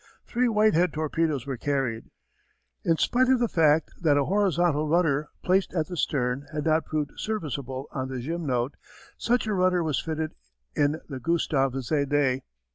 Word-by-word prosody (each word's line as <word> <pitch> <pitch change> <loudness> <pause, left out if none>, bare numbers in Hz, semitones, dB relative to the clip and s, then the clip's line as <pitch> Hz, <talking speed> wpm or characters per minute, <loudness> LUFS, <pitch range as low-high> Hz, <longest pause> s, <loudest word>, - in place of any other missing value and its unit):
Three 245 +1 +1
Whitehead 210 -6 +3
torpedoes 155 -3 -1
were 135 -2 -4
carried. 130 -4 -1 0.8
In 165 -1 +2
spite 255 +8 +2
of 260 -2 +4
the 240 - +2
fact 160 -4 +3
that 150 -4 +4
a 140 - +2
horizontal 175 -5 +2
rudder 155 -3 +2
placed 185 +1 +1
at 160 -3 +1
the 180 - -4
stern 135 -3 -1
had 150 -2 -3
not 160 0 +2
proved 150 -2 -2
serviceable 140 - -4
on 130 -2 -3
the 130 -1 -5
Gymnote, 135 -3 -2 0.5
such 245 0 +1
a 215 - -1
rudder 180 -2 +2
was 155 -4 0
fitted 160 -1 -3 0.4
in 145 +2 +1
the 135 -3 -6
Gustave 140 -5 +1
Zédé. 140 -1 +1
155 Hz, 160 wpm, -26 LUFS, 140-175 Hz, 0.8 s, of